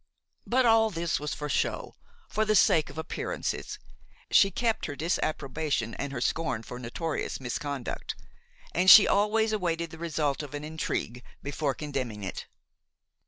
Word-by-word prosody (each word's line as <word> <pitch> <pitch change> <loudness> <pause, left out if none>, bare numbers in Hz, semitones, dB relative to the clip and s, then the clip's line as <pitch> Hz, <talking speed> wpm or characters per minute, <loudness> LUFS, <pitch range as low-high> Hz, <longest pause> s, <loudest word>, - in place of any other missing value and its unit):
But 255 +1 +3
all 225 -1 +5
this 170 -4 -1
was 150 0 -3
for 150 - -4
show, 145 - -1 0.3
for 215 - 0
the 215 0 +2
sake 160 -5 +4
of - - -11
appearances; 160 - -3 0.5
she 195 - +6
kept 225 +3 -1
her 145 - -5
disapprobation 150 -5 -1
and 140 - -4
her 130 - -4
scorn 160 -4 -1
for 125 +2 -8
notorious 145 +6 -3
misconduct, 135 +1 -4 0.6
and 185 +2 +4
she 210 - +11
always 220 +2 +2
awaited 170 -5 -1
the 160 - -10
result 155 -4 -1
of 145 -1 -7
an 145 - -5
intrigue 150 -6 -3 0.2
before 140 -1 -1
condemning 130 -8 -4
it. 95 - -5
155 Hz, 150 wpm, -28 LUFS, 140-185 Hz, 0.6 s, she